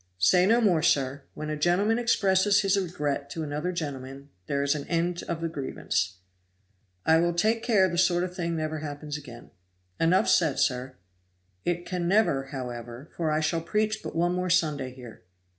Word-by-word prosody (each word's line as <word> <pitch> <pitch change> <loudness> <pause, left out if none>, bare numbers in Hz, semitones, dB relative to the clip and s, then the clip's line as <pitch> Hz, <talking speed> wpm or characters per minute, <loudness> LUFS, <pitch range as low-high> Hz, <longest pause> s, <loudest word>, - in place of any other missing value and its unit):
"Say 180 - +4
no 230 +3 +4
more, 180 -8 +3
sir. 140 -2 +1
When 155 0 -5
a - - -1
gentleman 185 +9 +2
expresses 200 -3 +3
his 195 -1 +2
regret 150 -7 -2
to 160 +3 -4
another 150 +4 -2
gentleman, 140 -4 -6 0.2
there 140 0 0
is 140 +1 +2
an 150 -2 -5
end 175 +1 0
of 165 -1 -3
the 165 - 0
grievance. 115 - -2 0.9
"I 160 0 +5
will 175 0 +1
take 220 +6 +2
care 205 -6 +3
the 175 -1 -1
sort 175 -1 +3
of 180 0 -5
thing 170 -2 -2
never 155 0 -2
happens 150 0 -6
again." 125 -5 -10 0.5
"Enough 175 +3 +3
said, 160 -5 +3
sir." 130 -2 0 0.7
"It 175 +1 -2
never 180 -4 +2
can, 135 - -15
however, 120 0 -7
for 165 -2 -1
I 155 +1 +1
shall 165 +2 0
preach 215 +5 -1
but - - -7
one 175 +2 +1
more 180 0 -1
Sunday 150 -7 +1
here." 125 -3 -12
165 Hz, 180 wpm, -27 LUFS, 140-180 Hz, 0.9 s, I